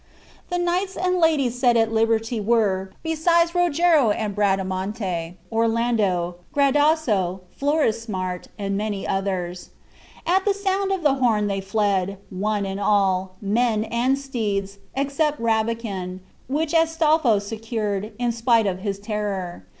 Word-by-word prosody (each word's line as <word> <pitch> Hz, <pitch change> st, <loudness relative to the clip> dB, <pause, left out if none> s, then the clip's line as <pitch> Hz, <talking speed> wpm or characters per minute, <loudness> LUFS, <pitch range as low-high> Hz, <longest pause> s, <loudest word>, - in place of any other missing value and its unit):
The 355 Hz, -, -1 dB
knights 360 Hz, +2 st, -1 dB
and 365 Hz, 0 st, +1 dB
ladies 280 Hz, -7 st, +2 dB
set 245 Hz, -2 st, +4 dB
at 225 Hz, -1 st, +2 dB
liberty 225 Hz, +1 st, +1 dB
were, 205 Hz, -3 st, +1 dB
besides 335 Hz, +1 st, +2 dB
Rogero 340 Hz, -6 st, +3 dB
and 210 Hz, 0 st, -1 dB
Bradamante, 190 Hz, -3 st, -1 dB, 0.2 s
Orlando, 225 Hz, -6 st, +1 dB, 0.2 s
Gradasso, 280 Hz, -, +2 dB
Florismart, 225 Hz, -, -1 dB
and 195 Hz, -1 st, -2 dB
many 205 Hz, -1 st, -2 dB
more. 190 Hz, -2 st, -1 dB, 0.7 s
At 375 Hz, +3 st, +2 dB
the 405 Hz, -1 st, +1 dB
sound 390 Hz, 0 st, 0 dB
of 380 Hz, -3 st, -1 dB
the 290 Hz, -3 st, +4 dB
horn 235 Hz, -6 st, +2 dB
they 195 Hz, -1 st, -1 dB
fled, 195 Hz, -1 st, 0 dB
one 205 Hz, +2 st, -1 dB
and 195 Hz, 0 st, -4 dB
all, 190 Hz, -2 st, +1 dB
men 215 Hz, +1 st, +1 dB
and 245 Hz, +4 st, +1 dB
steeds, 205 Hz, -7 st, -3 dB, 0.2 s
except 280 Hz, +2 st, 0 dB
Rabican, 220 Hz, -5 st, -1 dB, 0.3 s
which 300 Hz, +4 st, -1 dB
Astolpho 320 Hz, -7 st, +3 dB
secured, 215 Hz, 0 st, -3 dB
in 240 Hz, 0 st, 0 dB
spite 230 Hz, -1 st, +2 dB
of 185 Hz, -2 st, -1 dB
his 200 Hz, 0 st, -3 dB
terror. 200 Hz, -, -4 dB
225 Hz, 125 wpm, -23 LUFS, 195-280 Hz, 0.7 s, set